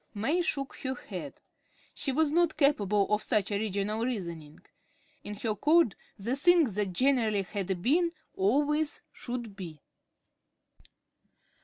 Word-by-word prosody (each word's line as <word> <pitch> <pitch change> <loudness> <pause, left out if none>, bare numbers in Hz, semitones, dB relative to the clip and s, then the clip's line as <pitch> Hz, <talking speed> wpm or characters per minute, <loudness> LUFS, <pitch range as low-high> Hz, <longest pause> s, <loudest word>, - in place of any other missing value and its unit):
May 280 - +1
shook 275 -5 -2
her 260 0 -3
head. - - -8 0.5
She 275 - -2
was 300 +2 +2
not 340 0 +2
capable 210 - +3
of 210 - +2
such 210 -2 0
original 205 +1 -1
reasoning. 170 -11 -5 0.6
In 210 - -6
her 215 +1 -2
code 300 - +4 0.2
the 230 +6 -2
thing 345 +4 +5
that 205 -6 -1
generally 225 -2 +2
had 190 -2 -3
been 335 +6 +3 0.2
always 290 +9 +1
should 240 -4 -5
be. 170 -6 -8
225 Hz, 125 wpm, -29 LUFS, 200-285 Hz, 0.6 s, thing